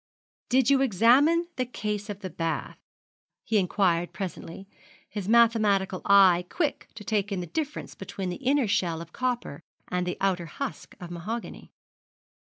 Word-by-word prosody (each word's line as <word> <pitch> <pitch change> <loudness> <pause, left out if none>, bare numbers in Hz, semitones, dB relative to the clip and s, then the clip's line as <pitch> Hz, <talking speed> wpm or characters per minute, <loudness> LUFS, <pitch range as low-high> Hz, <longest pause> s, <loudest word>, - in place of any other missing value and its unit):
'Did 260 +1 +3
you 275 -1 +4
examine 270 - +4
the 255 - +1
case 210 -4 -4
of 205 -1 -6
the 190 - -5
bath,' 165 -2 -3 0.7
he 220 - +2
inquired 180 -2 +1
presently, 190 -1 -7 0.4
his 205 -2 -5
mathematical 215 -5 +3
eye 190 -3 +6
quick 305 -5 -2
to 215 - -9
take 210 -1 -1
in 195 - -1
the 180 - -4
difference 295 - -4
between 195 -1 -6
the - - -5
inner 270 -1 +1
shell 170 -4 0
of 170 0 -10
copper 245 - -3 0.3
and 180 0 -1
the 180 - -3
outer 180 -3 0
husk 275 - -6
of 175 -2 -8
mahogany. 215 +8 -6
205 Hz, 155 wpm, -27 LUFS, 180-240 Hz, 0.7 s, eye